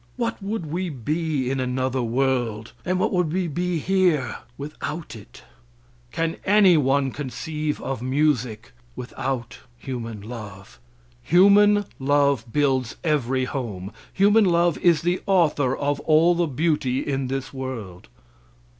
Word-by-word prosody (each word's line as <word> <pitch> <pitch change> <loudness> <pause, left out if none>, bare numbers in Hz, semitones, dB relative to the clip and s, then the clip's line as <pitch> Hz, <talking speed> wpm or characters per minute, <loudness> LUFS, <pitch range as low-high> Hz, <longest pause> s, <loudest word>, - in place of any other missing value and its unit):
What 230 -2 -2
would 200 -2 -3
we 175 +4 -3
be 145 0 -2
in 135 - -1
another 130 0 -1
world, 120 -3 -1
and 185 0 0
what - - 0
would 180 -4 +1
we 180 +1 -1
be 175 +2 -1
here 175 -6 +1 0.2
without 150 0 -6
it? 105 - -14 0.7
Can 165 0 -2
any 195 -2 +5
one 135 -2 +2
conceive 150 +3 -4
of 135 -3 -3
music 125 -4 0 0.2
without 125 0 -4 0.2
human 120 -4 -6
love? 100 - -10 0.4
Human 205 - +5
love 140 -4 +1
builds 135 -4 +1
every 130 -5 +1
home 110 -8 -5 0.2
human 205 +2 +4
love 170 -4 +2
is 170 -4 +3
the 175 +2 0
author 150 -8 +2
of 145 0 -1
all 160 +2 +4
the 175 -1 0
beauty 140 -3 0
in 135 -2 -1
this 135 +1 -4
world. 115 -9 -7
140 Hz, 130 wpm, -23 LUFS, 125-170 Hz, 0.7 s, any